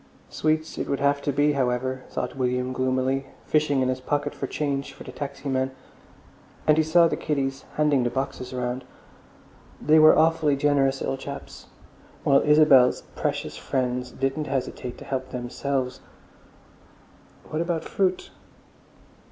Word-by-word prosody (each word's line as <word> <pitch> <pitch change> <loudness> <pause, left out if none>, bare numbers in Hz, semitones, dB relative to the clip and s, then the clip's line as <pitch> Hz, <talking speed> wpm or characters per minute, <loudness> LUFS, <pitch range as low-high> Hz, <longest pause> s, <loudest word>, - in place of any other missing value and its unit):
Sweets 155 +1 -1
it - - -2
would 140 - 0
have 140 0 +2
to 145 - 0
be, 145 +2 +3
however, 130 -1 -1
thought - - -4
William 125 0 -1
gloomily, 130 +1 0 0.2
fishing 150 -3 +2
in - - +1
his 130 0 -2
pocket 145 +2 -1
for 135 - -4
change 140 -1 -2
for - - -11
the 130 - -9
taxi 140 +1 -6
man. 130 -1 0 1.0
And 155 - +5
he 160 - +3
saw 165 +2 +5
the - - -1
kiddies 135 -2 -2
handing 150 -3 +3
the 120 - +1
boxes 130 -1 -4
round—they 125 +4 -3
were 155 0 +7
awfully 160 -2 +3
generous 140 -1 +2
little 135 - -1
chaps—while 140 0 -3
Isabel's 150 -4 +5
precious - - -2
friends 125 -1 -2
didn't 135 +4 -2
hesitate 130 -2 -3
to - - -11
help 130 -1 -3
themselves.... 130 +1 -3 1.5
What 155 - -1
about 170 -1 -2
fruit? 185 -2 -1
135 Hz, 140 wpm, -25 LUFS, 130-150 Hz, 1.5 s, were